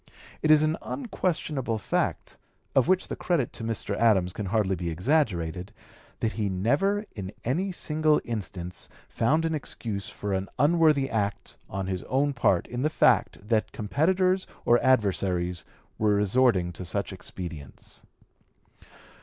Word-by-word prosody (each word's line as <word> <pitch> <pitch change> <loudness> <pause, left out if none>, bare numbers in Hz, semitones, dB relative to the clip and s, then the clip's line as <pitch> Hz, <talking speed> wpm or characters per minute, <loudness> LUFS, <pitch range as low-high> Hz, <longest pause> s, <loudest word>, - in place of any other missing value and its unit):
It 155 - +1
is 155 0 +7
an 155 +1 +1
unquestionable 155 - -2
fact, 105 - -2 0.3
of 130 -2 +3
which 185 0 +2
the - - -4
credit 165 -9 0
to - - -8
Mr. 110 -2 -2
Adams 95 -6 +3
can 105 - -4
hardly 100 -1 +1
be 85 -1 -3
exaggerated, 90 - 0 0.5
that 110 - +1
he 105 -4 -2
never 145 - +1
in 95 -3 -5
any 175 +11 0
single 155 -3 +2
instance 95 -6 -5 0.2
found 155 +8 +1
an 165 - 0
excuse 110 -8 -4
for 105 -1 -4
an 95 +1 -2
unworthy 150 -1 +4
act 105 -4 -2
on 95 0 -3
his 95 -1 -3
own 140 +2 +1
part 100 -8 +2
in 120 0 -5
the 155 - +2
fact 105 -8 +2
that 110 -1 +1
competitors 185 - +1 0.2
or 120 0 +4
adversaries 95 -8 +1 0.3
were 105 -1 +3
resorting 100 -3 +2
to 90 - -7
such 100 +3 -2
expedients. 85 -6 -9
115 Hz, 145 wpm, -27 LUFS, 95-150 Hz, 0.5 s, is